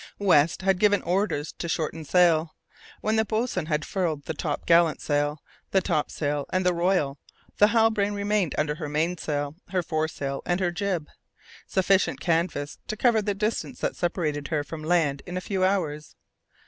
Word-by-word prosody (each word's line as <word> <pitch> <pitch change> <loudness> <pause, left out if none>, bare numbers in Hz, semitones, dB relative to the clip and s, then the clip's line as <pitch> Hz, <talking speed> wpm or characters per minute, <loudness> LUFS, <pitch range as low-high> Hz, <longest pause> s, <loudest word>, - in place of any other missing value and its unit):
West 170 -3 +3
had 190 -1 +2
given 205 -1 +3
orders 175 -5 0
to 170 - -6
shorten 160 0 -2
sail. 165 -1 +3 0.5
When 215 +1 +1
the 220 - +4
boatswain 215 -6 -1
had 150 -2 -1
furled 165 -7 -2
the 160 - -4
top 150 -1 -3
gallant 165 -1 +4
sail, 145 0 -1 0.3
the 190 - +3
top 155 -4 0
sail 145 -2 -2
and 185 0 +1
royal, 170 -5 +1 0.4
the 210 - +7
Halbrane 220 -2 +2
remained 200 -4 0
under 150 -1 +1
her 150 -1 -5
mainsail, 150 -2 -1
her 180 0 -1
fore 155 -1 -1
sail 140 -3 -4
and 175 +1 0
her 180 -2 +1
jib: 175 -4 -2 0.6
sufficient 190 +1 +2
canvas 165 -4 -1
to 215 - -4
cover 230 -1 +3
the 205 -1 -1
distance 215 +5 -2
that - - -1
separated 155 -5 -1
her 150 -3 -1
from 155 +1 -8
land 155 -4 +1
in 180 +1 -4
a - - 0
few 190 0 -2
hours. 160 -6 -1
170 Hz, 175 wpm, -26 LUFS, 150-195 Hz, 0.6 s, the